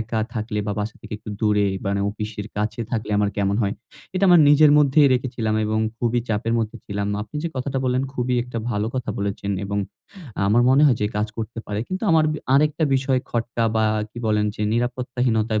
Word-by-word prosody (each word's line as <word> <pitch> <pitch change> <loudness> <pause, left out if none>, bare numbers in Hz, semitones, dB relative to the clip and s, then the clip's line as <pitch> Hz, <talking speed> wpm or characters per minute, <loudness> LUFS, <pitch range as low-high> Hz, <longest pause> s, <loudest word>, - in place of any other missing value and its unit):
একা 110 0 -2
থাকলে 110 -1 -3
বা 105 - -1
বাসা 105 +1 -4
থেকে - - -11
একটু 105 -1 -9
দূরে 105 -1 +2 0.2
মানে, 100 0 0
অফিসের 105 0 -6
কাছে 105 +2 -2
থাকলে 110 -3 -2
আমার 100 -1 +2
কেমন 100 0 +1
হয়? 100 - 0 0.4
এটা 185 +1 +2
আমার 175 -2 +7
নিজের 150 +1 +6
মধ্যেই 145 0 +5
রেখেছিলাম, 120 -3 -1
এবং 110 +1 0 0.2
খুবই 120 0 +1
চাপের 110 +1 -1
মধ্যে 115 +1 -2
ছিলাম। 100 0 -2 0.2
আপনি 110 +7 -9
যে - - 0
কথাটা 135 +1 -2
বললেন 130 0 +1
খুবই 125 0 0
একটা 125 -1 -6
ভালো 105 -1 -1
কথা 130 - -2
বলেছেন, 100 0 -3
এবং 100 +1 -2 0.7
আমার 115 +4 +4
মনে 135 +3 +5
হয় 125 - +4
যে 105 - +2
কাজ 105 +1 +1
করতে 115 +1 -5
পারে। 105 0 -3
কিন্তু 185 +1 -4
আমার 160 -1 +5
বি 155 - -4 0.2
আরেকটা 150 +3 +3
বিষয় 130 -1 +1
খটকা 115 0 -1
বা 110 - +3 0.3
কি 120 - -10
বলেন 105 -1 +2
যে 105 - -4
নিরাপত্তাহীনতায় 120 -2 0
115 Hz, 200 wpm, -22 LUFS, 105-130 Hz, 0.7 s, আমার